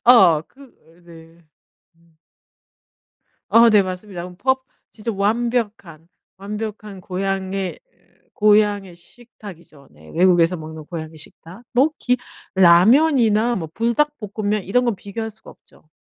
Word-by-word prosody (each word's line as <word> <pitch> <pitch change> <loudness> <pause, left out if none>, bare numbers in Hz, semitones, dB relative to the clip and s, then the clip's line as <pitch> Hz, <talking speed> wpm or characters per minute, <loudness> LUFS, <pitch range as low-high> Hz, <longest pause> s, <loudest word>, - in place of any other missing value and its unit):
아 190 -11 +6
그 275 - -24
으 175 -9 -22
네. 165 0 -16 0.5
음. 165 -1 -30 1.3
아 230 +1 +6
네 210 -2 +5
맞습니다. 185 -1 -7
퍼 260 +6 0 0.3
진짜 225 +1 -5
완벽한, 205 -6 -2 0.3
완벽한 210 0 -7
고향의, 190 0 -3 0.5
고향의 205 -4 +2
식탁이죠. 175 -8 -15
네. 75 +1 -17
외국에서 175 -1 +3
먹는 155 -1 -9
고향의 160 -1 -8
식탁. 170 +7 -13
뭐 265 +5 +4
기 250 0 0 0.4
라면이나 225 - +4
뭐 165 -6 -4
불닭볶음면 220 -5 -1
이런 245 +7 +1
건 235 -4 0
비교할 220 +4 -6
수가 215 - -16
없죠. 155 - -24
200 Hz, 240 characters per minute, -20 LUFS, 170-230 Hz, 1.3 s, 아